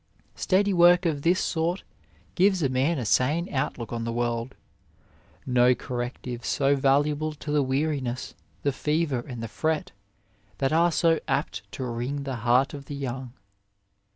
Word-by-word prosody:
Steady 200 +1 +1
work 175 +1 +6
of 150 -4 0
this 175 +4 +3
sort 170 +3 -1 0.5
gives 190 -1 +3
a 135 - +2
man 135 +6 +1
a 125 - -3
sane 145 - +2
outlook 125 -3 -2
on 115 -1 -3
the 115 - -2
world. 120 +1 -2 0.9
No 125 -1 +4
corrective 120 0 -5
so 140 +2 +2
valuable 145 +3 +1
to 150 0 -7
the 150 -1 +3
weariness, 135 -2 -2 0.3
the 140 - +2
fever 150 -2 0
and 120 -1 -7
the - - -3
fret 155 +6 -2 0.7
that 135 +1 0
are 170 +2 +4
so 165 0 +3
apt 100 -8 -2
to 130 - -4
wring 125 +4 -3
the 135 -2 -4
heart 125 +4 +2
of 140 -1 -8
the 145 - -6
young. 130 -2 -5
140 Hz, 155 wpm, -26 LUFS, 125-160 Hz, 0.9 s, work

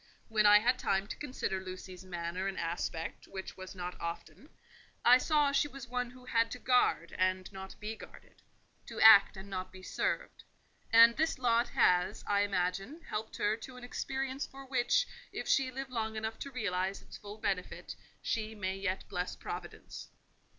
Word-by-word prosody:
When 215 -1 +4
I 205 0 +9
had 245 +4 +2
time 195 0 +1
to - - -6
consider 255 -9 -3
Lucy's 185 0 -8
manner 175 +1 -3
and 195 - -3
aspect, 165 -1 -3
which 190 -1 -7
was 185 0 -9
not 180 -1 -5
often, 170 0 -6 0.6
I 250 +1 +8
saw 295 0 +3
she 280 +1 +2
was 270 -2 -9
one 250 0 -2
who 250 0 -15
had 230 -2 +2
to - - -6
guard 245 -9 +2
and 185 +1 +1
not 190 0 -9
be 215 +1 -4
guarded; - - -14 0.5
to - - -7
act 210 -3 +8
and 190 +1 -8
not 185 -1 -5
be 185 0 -12
served: - - -2 0.5
and 230 +1 +8
this 320 0 +1
lot 240 -1 +2
has, 180 0 +3
I 200 0 +2
imagine, 195 - -1
helped 215 +1 -4
her 210 +1 +2
to 250 +3 -10
an 250 - -11
experience 265 +2 -3
for 270 0 -11
which, 265 - +2 0.3
if - - -5
she 270 -2 +3
live 265 +1 -6
long 220 -2 -2
enough 220 +1 -4
to 280 - -5
realize 195 -5 -2
its - - -11
full 205 +1 -9
benefit, 190 -4 -3 0.3
she 220 -1 -2
may 190 -2 -2
yet 195 -1 -3
bless 180 0 -3
Providence. - - -8
210 Hz, 180 wpm, -32 LUFS, 185-250 Hz, 0.6 s, I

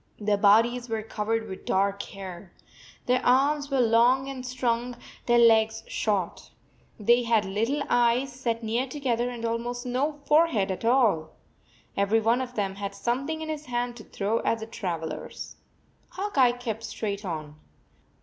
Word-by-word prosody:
Their 210 -1 +1
bodies 230 +4 +3
were 220 -1 -2
covered 220 +1 -2
\vith 190 - -8
dark 200 +1 +1
hair. 190 -2 -9 0.5
Their 250 +1 +1
arms 280 +3 +3
were 270 -2 +2
long 240 +3 +4
and 260 -2 -6
strong, 245 -1 -1 0.3
their 240 0 +4
legs 225 -1 +4
short. 200 -5 -2 0.5
They 235 +4 +4
had 230 -3 +2
little 225 +9 -1
eyes 245 +2 +2
set 235 -2 -2
near 235 +4 -1
together, 250 -3 -1
and 235 -2 -5
almost 240 +2 -3
no 260 +5 0
forehead 295 -11 +3
at 190 - -5
all. 225 -11 +2 0.6
Every 200 +3 +2
one 230 +3 +2
of 250 -1 -6
them 195 -2 -1
had 200 0 -5
something 275 +9 -2
in 315 - -5
his 305 -2 -5
hand 240 0 -2
to 220 - -10
throw 210 +3 -1
at 230 - +1
the 220 - -6
trav 180 -7 -4
elers. 160 - -7 0.6
Hawk 395 +3 -5
Eye 255 -3 +5
kept 235 -3 -5
straight 205 -1 -4
on. 155 -4 -6
230 Hz, 160 wpm, -26 LUFS, 210-250 Hz, 0.6 s, Eye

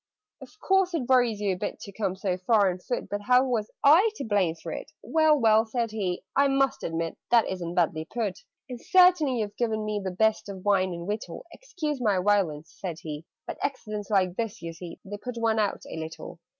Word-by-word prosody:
"Of 420 - -14
course 385 -2 +2
it 260 -7 -2
worries 245 -5 +3
you 200 -2 +1
a - - -5
bit - - -4
To 200 - -8
come 195 -2 -2
so 190 -1 -1
far 200 +1 +3
on 180 - -7
foot 245 +6 -4
But 205 0 -3
how 250 +4 +4
was 230 -5 -1
I 330 +10 +7
to - - -5
blame 195 -6 +1
for 165 - -8
it?" - - -7
"Well, 315 -1 +3
well!" 220 -3 +4
said 230 0 -2
he. 190 -5 -3
"I 280 0 +4
must 270 -1 +1
admit 165 0 -3
That 235 -2 +4
isn't 175 -2 -4
badly 160 -2 +1
put. 205 -1 -3 0.3
"And 250 -2 -8
certainly 350 -9 +4
you've 205 -1 -4
given 220 -3 -1
me 210 -1 -2
The 190 - -2
best 215 +3 +1
of 190 -1 -8
wine 190 -2 +3
and 170 +1 -7
victual 215 - -5
Excuse 315 - -5
my 210 -5 +2
violence," 180 -6 0
said 175 -5 -5
he, 150 0 -6 0.2
"But - - -7
accidents 215 -7 -4
like 185 -3 +1
this, 225 -3 -3
you 165 0 -5
see, 170 0 -9
They 205 +1 -6
put 245 +3 -7
one 225 -1 +1
out 205 -2 -1
a - - -7
little. 160 +1 -7
210 Hz, 215 wpm, -27 LUFS, 185-250 Hz, 0.3 s, I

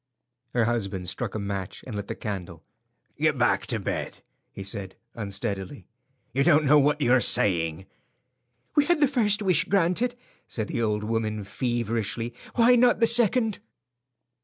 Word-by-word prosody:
Her 120 -2 +3
husband 100 -6 -2
struck 95 +3 -2
a - - -2
match 100 -2 -5
and 125 - -7
lit 100 -1 -5
the - - -4
candle. 90 -6 -6 0.6
"Get - - +2
back - - +1
to - - -1
bed," - - -4 0.3
he 100 - -8
said, 100 -1 -4 0.2
unsteadily. 100 -2 -4 0.5
"You 135 +2 +2
don't 155 -2 +4
know 150 +2 +6
what 150 +1 +2
you 125 - +2
are 130 0 +5
saying." 85 -4 +2 0.9
"We 295 - +4
had 345 0 +2
the 290 - +5
first 215 -6 +1
wish 185 -1 +2
granted," 200 +6 +1 0.3
said 110 -3 -4
the - - -2
old 105 -2 0
woman, 110 -1 -2
feverishly; 115 +1 -2 0.2
"why 245 +1 +5
not 245 0 +4
the 230 - +5
second?" 230 -1 +3
115 Hz, 160 wpm, -26 LUFS, -, 0.9 s, know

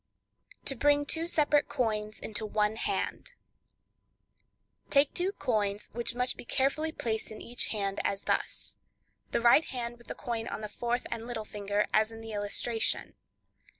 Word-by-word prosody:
To - - +2
Bring 290 +3 +4
Two 325 +3 0
Separate 300 -3 +3
Coins 215 -3 -1
into 220 0 -3
One 210 0 +1
Hand:—Take 280 - -4
two 365 +2 +1
cents, 210 -3 +1
which 235 +1 -2
must 250 +1 0
be - - -7
carefully 290 +5 +1
placed 220 -7 -1
in 215 - -8
each 240 +1 -2
hand, 200 -2 -1
as 200 0 0
thus: - - -1 0.5
The - - +1
right 240 +7 +7
hand 240 -1 -4
with 240 - -17
the - - -4
coin 230 -2 -3
on - - -4
the 210 - -4
fourth 240 +3 -1
and 230 0 -3
little 225 -3 -3
finger, 205 0 0
as 215 +1 +4
in 225 0 -9
the, 225 0 -7
illustration. 210 +2 +1
230 Hz, 155 wpm, -31 LUFS, 215-260 Hz, 0.5 s, right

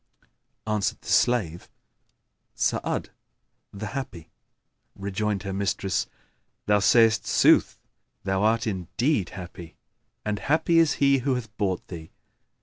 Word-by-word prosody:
Answered 105 -2 -1
the - - -10
slave, 95 -9 +1 0.9
"Sa'ad, - - -1 0.6
the 100 +1 -7
happy." 105 - -6 0.6
Rejoined 100 +1 -2
her 100 -1 -4
mistress; 95 -1 -1 0.6
"Thou 105 0 +3
sayst 110 +2 +4
sooth, - - +4 0.5
thou 95 0 0
art 115 +3 +2
indeed 105 - -1
happy, 90 -2 -9 0.5
and 105 -1 -1
happy 160 +6 +2
is 165 -3 +4
he 140 -1 +3
who 130 +1 0
hath 110 -3 -6
bought 95 -5 -2
thee." 80 -3 -8
105 Hz, 115 wpm, -25 LUFS, 95-120 Hz, 0.9 s, sayst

